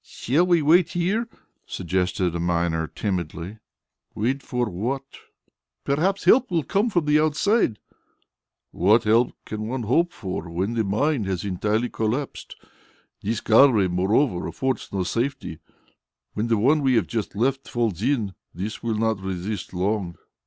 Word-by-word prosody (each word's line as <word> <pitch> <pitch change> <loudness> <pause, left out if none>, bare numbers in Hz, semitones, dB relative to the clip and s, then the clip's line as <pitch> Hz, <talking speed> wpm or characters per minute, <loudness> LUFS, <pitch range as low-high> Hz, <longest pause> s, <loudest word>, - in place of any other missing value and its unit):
"Shall 155 +9 0
we 170 -3 +3
wait 170 +3 +4
here?" 200 +7 0 0.4
suggested 90 0 -1
a 85 - -3
miner 85 -1 0
timidly. 90 +1 -4 0.6
"Wait 130 +6 -1
for 125 -2 -2
what?" 120 +9 -3 0.8
"Perhaps 180 +8 0
help 260 +1 +5
will 170 -4 0
come 205 +9 +1
from 175 -7 0
outside." 155 - +2 0.9
"What 105 +6 +3
help 115 +3 +3
can 110 0 -5
one 125 +1 -3
hope 170 +11 +2
for, 95 - -5
when 95 +7 -2
the 115 -1 +1
mine 110 +5 0
has 95 -1 -3
entirely 105 +5 0
collapsed? 120 +6 -3 0.7
This 110 +2 -2
gallery, 115 -4 +5
moreover, 95 +4 +1
affords 130 +9 -2
no 95 -2 -1
safety. 115 - -3 0.7
When 110 +2 -1
the 115 -1 +2
one 140 +8 +3
we 130 -2 +3
have 115 - +3
just 110 -4 -4
left 135 +5 0
falls 115 -7 -1
in, 115 -6 0 0.2
this 100 +5 -5
will 115 -2 -1
not 110 -2 0
resist 95 +1 -4
long." 95 -1 -1
110 Hz, 145 wpm, -24 LUFS, 95-140 Hz, 0.9 s, help